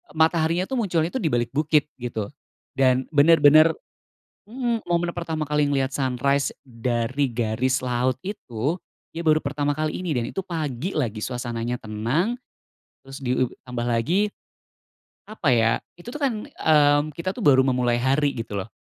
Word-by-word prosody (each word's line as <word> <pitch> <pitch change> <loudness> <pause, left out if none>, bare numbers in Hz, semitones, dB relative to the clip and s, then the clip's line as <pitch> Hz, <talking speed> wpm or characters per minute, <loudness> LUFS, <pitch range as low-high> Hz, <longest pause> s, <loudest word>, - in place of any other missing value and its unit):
Mataharinya 165 +2 +2
itu - - -6
muncul 180 -9 +1
tu 260 +9 -4
di 165 - +1
balik 120 -1 0
bukit 150 +1 +2
gitu, 115 -4 -3 0.5
dan 130 -1 +2
bener-bener 155 +1 +7 0.7
mmm, 235 +1 -2
momen 175 0 0
pertama 160 -3 -3
kali 150 0 +2
ngelihat 135 -2 +1
sunrise 140 +1 0
dari 120 +2 -1
garis 120 +3 0
laut 125 0 0
itu, 145 - -3 0.4
iya 170 +1 -4
baru 155 -1 +4
pertama 145 0 -1
kali 155 +3 -2
ini 170 - -1
dan 120 -4 -1
itu 195 - -4
pagi 160 -1 -3
lagi, 115 -7 -2
suasananya 120 -1 -3
tenang, 120 - -1 0.7
terus, 135 +1 -10
ditambah 125 -1 -2
lagi 160 - +1 1.0
apa 170 -11 +1
ya, 115 -1 +3 0.3
itu 175 - -9
tuh 250 - -6
kan, 275 -4 +2 0.2
mmm, 150 - +3
kita 170 +5 -4
tuh 240 - -5
baru 130 -2 +6
memulai 125 -2 +1
hari 140 +2 +2
gitu 115 -3 -5
loh. 100 +2 -5
140 Hz, 150 wpm, -24 LUFS, 125-165 Hz, 1.0 s, bener-bener